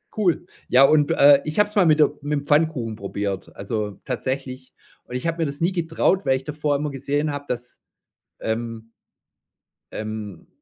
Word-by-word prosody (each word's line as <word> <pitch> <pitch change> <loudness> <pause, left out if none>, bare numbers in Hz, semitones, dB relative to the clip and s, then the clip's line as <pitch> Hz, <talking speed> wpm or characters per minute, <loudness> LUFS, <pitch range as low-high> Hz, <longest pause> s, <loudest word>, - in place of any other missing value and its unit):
Cool. 180 -5 +1 0.2
Ja, 130 +2 +6
und, 145 0 +4
äh, 140 0 +6
ich 155 +6 -2
hab's 210 +1 +2
mal 195 -4 +5
mit 155 -1 +4
der 150 - +7
mit 145 0 -1
dem - - -15
Pfannkuchen 145 -7 +1
probiert, 100 -1 -4
also, 105 0 -4
tatsächlich. 130 0 -4 0.3
Und 125 - -9
ich 125 +6 -2
hab 165 +1 -1
mir 165 - 0
das 140 +2 -6
nie 175 +3 +2
getraut, 170 0 +1
weil 130 0 +3
ich 130 - -10
davor 150 -1 -1
immer 150 +1 -1
gesehen 145 +3 -1
hab, 145 0 -6
dass, 125 0 -5 0.6
ähm 115 0 -4 1.0
ähm, 110 -5 -6
140 Hz, 175 wpm, -23 LUFS, 115-155 Hz, 1.0 s, der